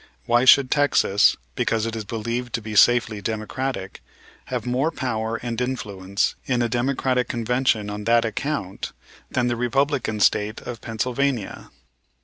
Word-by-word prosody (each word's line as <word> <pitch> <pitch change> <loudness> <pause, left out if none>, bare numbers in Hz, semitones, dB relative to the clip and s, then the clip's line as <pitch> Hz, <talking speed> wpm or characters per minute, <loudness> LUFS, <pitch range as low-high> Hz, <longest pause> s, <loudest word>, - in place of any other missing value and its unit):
Why 120 +2 +3
should 130 0 +6
Texas, 140 -8 +3 0.2
because 115 -1 0
it 115 0 -3
is 110 -1 -5
believed 115 +3 -4
to 115 - -1
be 110 0 -6
safely 115 -1 +4
Democratic, 110 -1 -4 0.4
have - - -4
more 130 +5 +1
power 115 -7 -2
and 120 0 -3
influence 100 -5 -2
in 125 -2 +1
a - - +1
Democratic 125 +1 0
Convention 120 -2 0
on 105 0 -5
that 115 +1 +4
account 110 -3 -3 0.4
than 125 - 0
the 120 -1 0
Republican 125 -1 0
State 105 +1 +2
of 120 -3 -7
Pennsylvania? 125 0 -2
120 Hz, 140 wpm, -23 LUFS, 110-125 Hz, 0.4 s, should